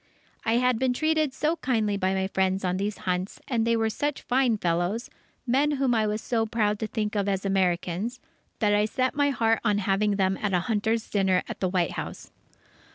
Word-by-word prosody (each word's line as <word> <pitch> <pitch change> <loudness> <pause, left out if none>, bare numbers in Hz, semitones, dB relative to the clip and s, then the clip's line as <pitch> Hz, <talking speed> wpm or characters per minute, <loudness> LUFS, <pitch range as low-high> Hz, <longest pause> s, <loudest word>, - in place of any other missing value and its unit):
I 225 - +1
had 250 -1 +2
been 260 -1 +2
treated 310 +1 +1
so 310 +5 0
kindly 220 -8 0
by 190 -1 0
my 190 0 0
friends 190 0 0
on 180 0 0
these 200 +2 -2
hunts, 180 +1 -2
and 230 -3 0
they 230 0 +3
were 225 0 +1
such 290 +4 -2
fine 250 -3 +2
fellows, 175 +5 -1 0.3
men 275 +4 +2
whom 270 -3 +1
I 220 -2 +2
was 210 +1 -2
so 225 -2 0
proud 210 -2 0
to 220 - -2
think 215 -1 -2
of 200 -1 0
as 195 0 -1
Americans, 190 +4 0 0.4
that 210 -2 +2
I 210 0 +3
set 255 +4 0
my 285 0 +2
heart 225 -4 +2
on 210 -3 +2
having 205 +1 +1
them 190 -1 +1
at 205 -2 -1
a 180 - +3
hunters' 220 +2 0
dinner 190 -3 +2
at - - -6
the 185 - 0
White 180 -3 +1
House. - - -7
215 Hz, 210 wpm, -26 LUFS, 195-245 Hz, 0.4 s, they